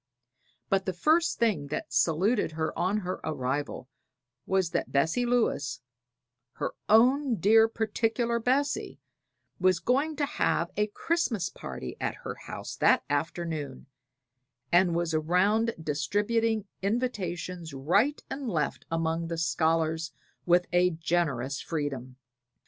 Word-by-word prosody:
But 195 0 0
the 185 - 0
first 315 - +2
thing 205 -12 +1
that 150 - -5
saluted 185 +3 +2
her 160 0 -2
on 200 +4 0
her 185 0 -4
arrival 135 -1 -3 0.6
was 190 -3 +1
that - - -2
Bessie 160 - +1
Lewis 145 - +1 0.7
her - - -3 0.2
own 255 +4 +5
dear, 220 +4 +5
particular 225 +1 0
Bessie 265 +5 0 0.6
was 185 -1 +4
going 275 - +1
to 290 0 0
have 170 - 0
a 210 +1 +1
Christmas 225 - -1
party 65 - -7
at - - -1
her - - -3
house - - -8
that - - +4
afternoon, 155 -3 -3 0.9
and 175 -1 +4
was 170 -1 0
around 190 +8 +2
distributing 205 +8 0 0.2
invitations 185 -6 -2
right 190 - +1
and 270 -3 -4
left 155 -7 -2
among 165 0 -1
the 165 0 -3
scholars 160 0 0 0.3
with 175 +1 +4
a 180 +1 +5
generous 155 -6 -1
freedom. 140 -5 -4
180 Hz, 120 wpm, -28 LUFS, 160-225 Hz, 0.9 s, own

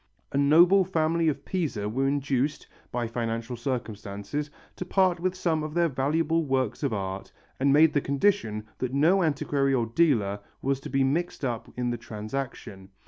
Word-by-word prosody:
A - - -1
noble 170 +7 +6
family 165 -2 +1
of 145 -2 -1
Pisa 150 - -2
were 130 +6 0
induced, 140 0 0 0.3
by 120 -1 -1
financial 115 +1 -3
circumstances, 120 +2 -4 0.3
to - - -4
part 185 -1 +2
with 185 +1 -1
some 165 -4 0
of 155 +1 -5
their 170 -1 +3
valuable 160 +5 +1
works 130 -5 -1
of 140 -4 0
art 95 -2 -4 0.3
and 135 +1 +3
made 150 +2 +6
the 145 - +2
condition 140 - 0
that 130 +1 -2
no 170 +7 +4
antiquary 140 -3 +1
or 120 -3 +1
dealer 115 -6 +2 0.2
was 135 0 -1
to - - -8
be 135 +1 +2
mixed 150 +2 -1
up 120 -3 -4
in 125 -1 -1
the 120 - -2
transaction. 110 -3 -6
140 Hz, 170 wpm, -27 LUFS, 120-160 Hz, 0.3 s, noble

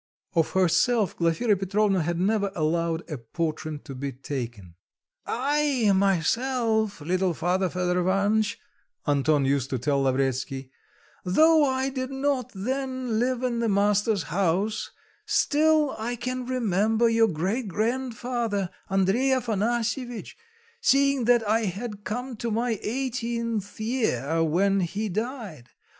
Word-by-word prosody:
Of 165 -2 +1
herself, 190 +3 +2
Glafira 175 +7 +2
Petrovna 195 0 +1
had 170 +2 -1
never 200 +1 +1
allowed 165 +1 -1
a 150 -6 -5
portrait 155 +4 -4
to 140 - -7
be 135 +1 -4
taken. 120 -8 -6 0.5
"I, 275 -3 +1
myself, 220 - +1
little 180 +2 0
father, 180 +3 0
Fedor 180 0 0
Ivanitch," 205 +4 +1 0.5
Anton 145 0 +2
used 135 -1 +1
to 130 - -1
tell 140 +3 0
Lavretsky, 130 0 -1 0.5
"though 315 - +5
I 265 0 0
did 260 -1 -4
not 270 -2 -1
then 255 +1 -2
live 255 +1 0
in 240 -2 0
the 230 -1 +1
master's 205 0 +2
house, 195 +4 0 0.4
still 305 -1 +3
I 235 +3 -2
can 255 +1 -4
remember 225 -2 +2
your 225 0 +4
great 195 +7 -2
grandfather, 230 -2 -2 0.2
Andrey 195 +7 +2
Afanasyevitch, 240 0 -1 0.5
seeing 275 - +3
that 240 -2 +3
I 220 +1 +2
had 205 +2 -5
come 245 +5 -4
to 235 - -3
my 230 0 -1
eighteenth 230 -4 -3
year 165 - 0
when 195 +5 +2
he 205 +4 -2
died. 210 - -5
210 Hz, 125 wpm, -26 LUFS, 175-245 Hz, 0.5 s, though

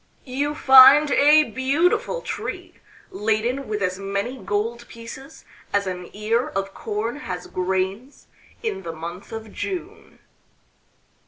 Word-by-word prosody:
You 285 +3 -2
find 270 +2 +8
a 300 +2 +6
beautiful 330 - 0
tree - - -6 0.4
laden 220 +6 -1
with 210 -2 -2
as 185 +1 -1
many 200 +5 -3
gold 230 +3 -3
pieces 250 +6 -11 0.3
as 200 0 +1
an 180 -1 -5
ear 220 +4 0
of 195 0 -4
corn 220 +4 -4
has 185 -11 -6
grains 190 +8 -3 0.4
in 445 - -3
the 165 -3 -6
month 170 +6 -8
of 225 -2 -8
June." 380 +2 -6
230 Hz, 120 wpm, -23 LUFS, 195-275 Hz, 0.4 s, find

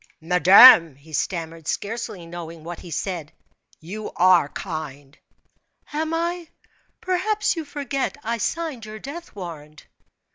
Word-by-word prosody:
"Madame," 180 - +8
he 150 +3 -18
stammered, 165 -1 -3
scarcely 205 -3 -4
knowing 165 -1 -9
what 170 +1 -7
he 175 - -11
said, 165 -1 -4 0.5
"you 205 +7 -7
are 175 -4 +4
kind." 150 -5 -7 0.7
"Am 315 +1 -2
I? 340 +1 -2 0.5
Perhaps 415 +3 0
you 325 - -4
forget 280 -2 -3
I 230 +1 -2
signed 315 -2 -3
your 215 0 -8
death 290 +7 -9
warrant." 155 -5 -9
185 Hz, 120 wpm, -23 LUFS, -, 0.7 s, Madame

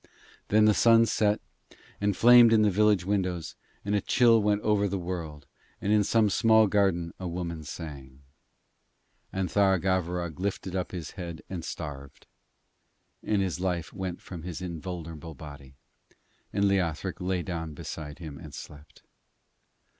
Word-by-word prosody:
Then 105 +1 +4
the 110 - +5
sun 115 +1 +5
set 105 -2 +1 0.6
and 100 -1 +1
flamed 120 -1 +8
in 110 -1 +5
the 105 - +3
village 105 -2 +3
windows, 90 -5 -2 0.3
and 100 - -1
a 105 - +2
chill 115 0 +4
went 105 0 +1
over 105 -1 +2
the 100 0 -2
world, 85 -5 -5 0.3
and 100 - 0
in 105 -1 +4
some 110 +1 +3
small 110 +1 +4
garden 95 -5 +1
a 95 - -4
woman 85 -2 -4
sang; 70 -3 -9 1.1
and 95 -1 -1
Tharagavverug 90 -3 +1
lifted 95 -1 -3
up 90 - -2
his 85 -5 -6
head 85 -3 -7
and 90 -3 -4
starved, 75 -5 -8 1.0
and 105 -2 0
his 90 -2 -3
life 90 -3 -2
went 95 -2 -5
from 90 -3 -8
his 85 -1 -6
invulnerable 85 -2 -7
body, 70 -1 -11 0.8
and 100 0 +1
Leothric 95 -2 -1
lay 90 -1 -1
down 80 -3 -5
beside 75 0 -7
him 80 -5 -9
and - - -10
slept. 75 0 -12
90 Hz, 145 wpm, -28 LUFS, 80-100 Hz, 1.1 s, flamed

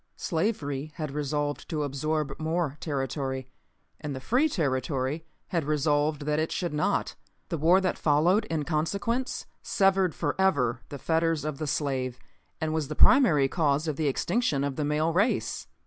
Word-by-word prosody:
Slavery 155 -6 -2
had 155 -4 -4
resolved 145 0 -2
to 155 -3 -1
absorb 150 +1 -2
more 160 -2 -1
territory, 135 -2 -3 0.5
and 150 -3 -4
the - - -4
free 250 - +2
territory 140 - -1 0.2
had 170 -3 0
resolved 150 0 +1
that 150 0 +1
it 160 - -1
should 175 -4 -2
not. 150 - 0 0.4
The 165 - -2
war 170 +5 +5
that 185 - -1
followed 165 +8 +3
in 160 -2 -2
consequence 200 - -1 0.2
severed 195 -3 +2
forever 145 -7 +1
the 140 - -6
fetters 165 0 0
of 155 -3 -3
the 155 - -2
slave 130 -3 -1 0.4
and 160 -1 -1
was 155 -3 -1
the 155 - -5
primary 170 - +6
cause 150 0 +1
of 155 - -1
the 155 +1 0
extinction 140 - 0
of 140 -1 -2
the 150 - -1
male 155 +2 +1
race. 200 +8 0
155 Hz, 160 wpm, -28 LUFS, 140-165 Hz, 0.5 s, primary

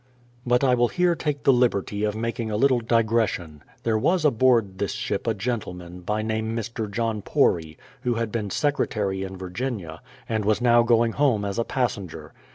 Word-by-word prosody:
But 125 +2 +3
I 130 -2 +4
will 120 0 +3
here 180 +5 +2
take 150 -4 -3
the 135 - +5
liberty 105 -4 +1
of 105 0 -1
making 115 0 -3
a 105 - -1
little 130 +1 +3
digres 115 -1 +2
sion. 75 -4 -8 0.2
There 110 -2 +1
was 175 +7 +2
aboard 115 -7 +3
this 100 - -1
ship 100 +3 -3
a 115 - +1
gentleman, 90 -5 -4
by 105 +4 -2
name 110 0 -2
Mr. 115 -1 -4
John 110 0 -2
Pory, 80 -5 +1 0.2
who 125 -2 0
had 115 -2 -2
been 105 -3 -2
secretary 105 -8 -1
in 95 0 -5
Virginia, 95 -3 -5 0.3
and 110 -2 -1
was 105 +1 +2
now 120 -1 +5
going 115 -1 +3
home 125 -7 +1
as 100 +3 -3
a - - +2
passenger. 115 - -3
115 Hz, 185 wpm, -24 LUFS, 100-120 Hz, 0.3 s, the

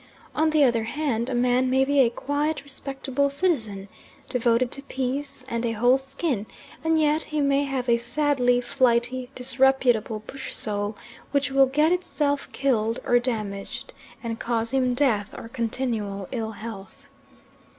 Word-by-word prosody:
On 315 +1 +2
the 310 -2 +4
other 235 -4 +3
hand, 255 -3 -1
a 255 - -1
man 250 +1 +2
may 265 +1 +3
be 285 +1 +2
a 250 -3 +6
quiet, 290 +5 -2
respectable 275 0 -2
citizen, 240 - -1 0.4
devoted 240 0 +2
to 275 - -4
peace 270 0 -4
and 235 -2 -2
a 230 -1 0
whole 245 +4 +4
skin, 270 - -3 0.4
and 320 0 +3
yet 305 0 +3
he 305 - -3
may 280 0 +2
have 265 -2 -2
a 235 -1 +4
sadly 245 0 +2
flighty 250 -1 +1
disreputable 250 -4 +2
bush 270 +3 -6
soul 205 0 -1 0.3
which 280 -1 0
will 270 0 +5
get 300 +5 +3
itself 295 -5 -1
killed 230 -4 +1
or 245 - +4
damaged 215 -5 -4 0.3
and 230 -1 -4
cause 230 -1 -1
him 255 -2 +2
death 230 -7 +1
or - - -7
continual 225 -5 -3
ill 225 -3 -3
health. 205 -3 -9
255 Hz, 150 wpm, -25 LUFS, 230-280 Hz, 0.4 s, a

